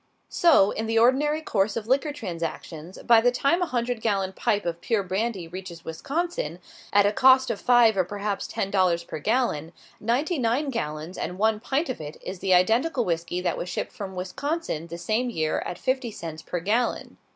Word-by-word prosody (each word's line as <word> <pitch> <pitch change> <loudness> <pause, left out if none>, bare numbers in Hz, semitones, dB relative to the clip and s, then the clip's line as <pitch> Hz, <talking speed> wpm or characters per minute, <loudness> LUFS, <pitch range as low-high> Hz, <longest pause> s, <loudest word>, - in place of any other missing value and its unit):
So, 300 - +5
in 220 - -3
the 225 0 0
ordinary 280 +6 +3
course 205 -8 0
of 220 - -4
liquor 275 +5 +1
transactions, 170 - -6
by 230 -1 +6
the 245 +1 +4
time 280 +8 +1
a 355 - +1
hundred 240 -2 -2
gallon 195 -4 0
pipe 205 +1 0
of 170 0 -3
pure 220 -4 0
brandy 190 -1 -2
reaches 175 -1 -9
Wisconsin, 275 - -3 0.3
at 205 0 +5
a 205 - +3
cost 260 +1 +5
of 215 - -5
five 240 -3 +5
or 190 - +3
perhaps 205 +2 -3
ten 195 - -3
dollars 180 -3 +2
per 165 - -7
gallon, 175 - 0 0.3
ninety 270 - 0
nine 255 +4 0
gallons 155 -5 -4
and 180 - -4
one 220 +1 +2
pint 275 +8 -1
of 255 - -4
it 150 0 -7
is 185 0 -5
the 190 - -1
identical 235 - +2
whisky 170 +1 -2
that 180 - -1
was 180 - -4
shipped 170 - -3
from 195 -5 -7
Wisconsin 185 - -3
the 170 0 -7
same 220 +8 -1
year 160 -8 -1
at 175 - -5
fifty 260 +1 -1
cents 165 -6 -7
per 175 - -4
gallon. 220 +7 -1
210 Hz, 195 wpm, -25 LUFS, 180-250 Hz, 0.3 s, by